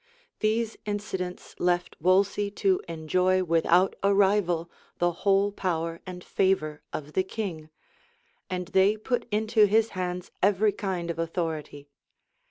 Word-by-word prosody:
These 220 +1 0
incidents 190 -3 -4
left 175 0 0
Wolsey 195 +3 +3
to 195 -2 +1
enjoy 180 +3 +1
without 170 +2 +3
a 200 0 +3
rival 190 -4 +2 0.3
the 175 0 +2
whole 195 +3 +2
power 165 -4 -2
and 180 -1 -7
favor 155 -6 0
of 150 0 -6
the 190 - +3
king; 185 -6 -5 0.8
and 180 -1 -3
they 195 +3 +4
put 245 +3 -2
into 215 +1 +3
his 220 +2 +3
hands 180 -1 -4
every 205 +2 +3
kind 185 -5 -3
of 165 - -7
authority. 160 -4 -3
185 Hz, 130 wpm, -27 LUFS, 170-205 Hz, 0.8 s, they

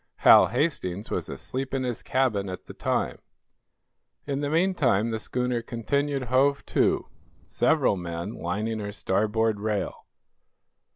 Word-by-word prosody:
Hal - - +9
Hastings 115 - -2
was - - -2
asleep 135 +1 -4
in 130 - -1
his 125 -2 -3
cabin 115 -7 0
at 90 - -7
the - - -10
time. - - -1 1.1
In 140 -1 -2
the 145 - -1
meantime 150 - +2
the 110 - -2
schooner 125 +1 -1
continued 140 +4 -1
"hove 135 +3 +2
to," - - +2 0.4
several 100 - +2
men 85 +3 -5
lining 105 +6 -3
her 105 -1 -4
starboard 105 +2 0
rail. 105 -1 -3
115 Hz, 130 wpm, -26 LUFS, 105-135 Hz, 1.1 s, Hal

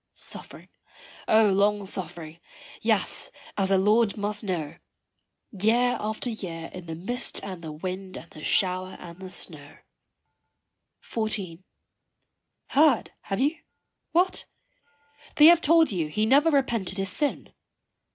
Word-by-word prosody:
Suffering - - -4 0.6
O 220 -2 +5
long 200 +1 +2
suffering 170 -4 -4 0.4
yes, - - 0 0.3
as 195 -2 +1
the 195 - +4
Lord 210 +3 +3
must 205 +1 -2
know, 165 -6 -3 0.7
Year 235 +4 +2
after 215 +3 -3
year 170 -7 -6
in 180 -2 -9
the 165 - -5
mist 225 +10 -3
and 185 -3 -6
the 160 -2 -6
wind 185 +4 -6
and 170 - -10
the 155 - -11
shower 185 0 0
and 170 0 -11
the 190 -1 -8
snow. 155 -5 -5 1.3
XIV. 200 -6 -3 1.1
Heard, 285 -4 +3
have 195 - -2
you? 290 +5 +1 0.5
what? 360 +3 +2 0.9
they 300 - +7
have 340 +1 +8
told 325 -1 +4
you 170 -5 -1
he 215 +8 0
never 285 +7 +5
repented 235 - 0
his 195 0 -1
sin. 290 -2 -2
195 Hz, 130 wpm, -26 LUFS, 180-235 Hz, 1.3 s, have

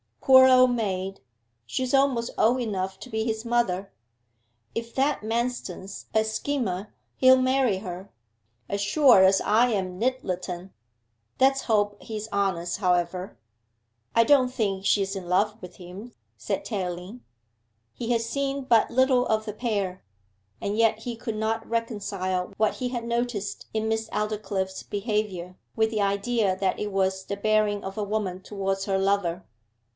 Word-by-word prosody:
Poor 260 -1 +7
old 255 -1 +6
maid, 195 -5 -2 0.5
she's 255 - -2
almost 270 -4 +2
old 245 +4 +3
enough 190 -5 -3
to 255 - -10
be 220 -1 -1
his 220 -1 -2
mother. 200 -5 0 0.8
If 230 0 -5
that 275 +2 +1
Manston's 220 -4 -3
a 220 0 +4
schemer 220 -3 -2 0.2
he'll 260 0 +7
marry 255 -6 +2
her, 185 0 -7 0.6
as 200 0 -1
sure 245 -1 +6
as 190 0 +5
I 235 +3 +3
am 185 -3 -2
Nyttleton. 185 -7 -2 0.7
Let's 270 +1 +4
hope 205 -2 +1
he's 215 -1 -6
honest, 185 -3 0
however.' 180 - 0 0.8
'I 230 - +6
don't 260 +1 +5
think 200 -5 -2
she's 195 -1 +2
in 185 -2 -6
love 210 +5 +1
with 180 - -10
him,' 190 +6 -10 0.2
said - - -3
Tayling. 185 +2 -4 0.7
He 240 0 -4
had 230 -1 +2
seen 275 +3 -2
but 235 -4 +4
little 260 0 +3
of 215 0 0
the 210 - -4
pair, 200 -5 -2 0.6
and 205 +1 -2
yet 225 -1 +3
he 235 +1 -5
could 225 -1 -5
not 220 +1 -2
reconcile 200 -5 -2
what 215 0 +2
he 250 -1 -3
had 240 -2 -3
noticed 235 -3 -2
in 220 0 -1
Miss 220 0 -1
Aldclyffe's 205 -3 -2
behaviour 200 -4 -3 0.2
with 220 0 +2
the 215 -2 0
idea 200 0 +1
that 190 -1 0
it 210 0 -3
was 190 -1 0
the 200 - -4
bearing 210 0 +1
of 195 +1 -6
a 210 - -1
woman 200 -3 -2
towards 195 -1 -3
her 195 -1 +1
lover. 190 -2 0
210 Hz, 150 wpm, -26 LUFS, 190-235 Hz, 0.8 s, Poor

